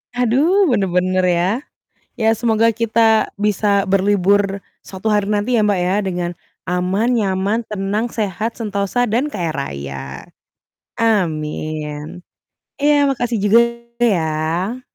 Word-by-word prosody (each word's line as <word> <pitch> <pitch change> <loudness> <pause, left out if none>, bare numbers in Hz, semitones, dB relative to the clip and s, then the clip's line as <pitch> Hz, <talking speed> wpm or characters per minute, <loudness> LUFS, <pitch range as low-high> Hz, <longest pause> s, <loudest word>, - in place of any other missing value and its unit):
Aduh 280 - +3
bener-bener 185 -3 +1
ya, 175 +1 +2 0.7
ya 220 -1 +2
semoga 225 0 +2
kita 225 0 +2
bisa 205 -1 +1
berlibur 195 0 +2 0.2
suatu 190 +3 -7
hari 205 -1 +1
nanti 210 +4 0
ya - - +3
Mbak, 205 -3 +2
ya 185 +2 +1
dengan, 180 -3 -2 0.3
aman, 185 +6 0
nyaman, 200 0 0
tenang, 210 +3 -2
sehat, 220 +1 -3
sentosa 210 +2 -1
dan 245 +7 0
kaya 175 - -3
raya, 70 - -5 1.0
amin. 155 -5 -2 0.6
Iya 295 0 +4
makasih 245 -4 -1
juga 210 +3 +5 0.4
ya. 175 +4 -1
205 Hz, 110 wpm, -18 LUFS, 180-225 Hz, 1.0 s, juga